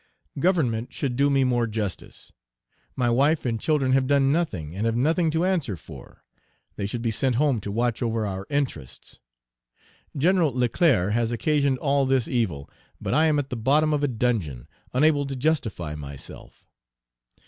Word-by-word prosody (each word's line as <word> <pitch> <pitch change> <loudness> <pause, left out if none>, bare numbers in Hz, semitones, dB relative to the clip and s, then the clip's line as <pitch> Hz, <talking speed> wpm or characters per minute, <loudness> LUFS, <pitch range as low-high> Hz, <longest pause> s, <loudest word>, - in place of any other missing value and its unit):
Government 135 -9 +1
should 130 -4 -3
do 140 +2 +3
me 135 -1 +3
more 120 -2 +1
justice: 105 -4 -6 0.6
my 125 -2 0
wife 145 +6 +2
and 115 -2 -1
children 145 -4 +1
have 130 0 +2
done 140 -1 +3
nothing 95 - -2
and 105 +4 -1
have 115 - 0
nothing 160 +7 +2
to 160 +3 0
answer 160 - -1
for; - - -13 0.5
they 100 - -3
should 115 +3 -4
be 115 - 0
sent 125 +3 0
home 135 -2 +2
to 100 - -5
watch 120 +3 -1
over 115 -2 -1
our 95 -1 -5
interests. 125 - -4 1.0
Gen. 180 +6 +3
Leclerc 125 - +2
has 115 0 0
occasioned 140 +2 +1
all 140 0 +1
this 130 -3 +1
evil; 90 - -1 0.3
but - - -3
I 160 +2 +4
am 150 -1 +2
at 140 -1 -3
the - - -2
bottom 145 +7 +2
of 145 - 0
a 145 - +2
dungeon, 110 - -2 0.2
unable 145 +1 +2
to 135 - -4
justify 120 - -1
myself. 70 -2 -10
130 Hz, 170 wpm, -25 LUFS, 110-145 Hz, 1.0 s, I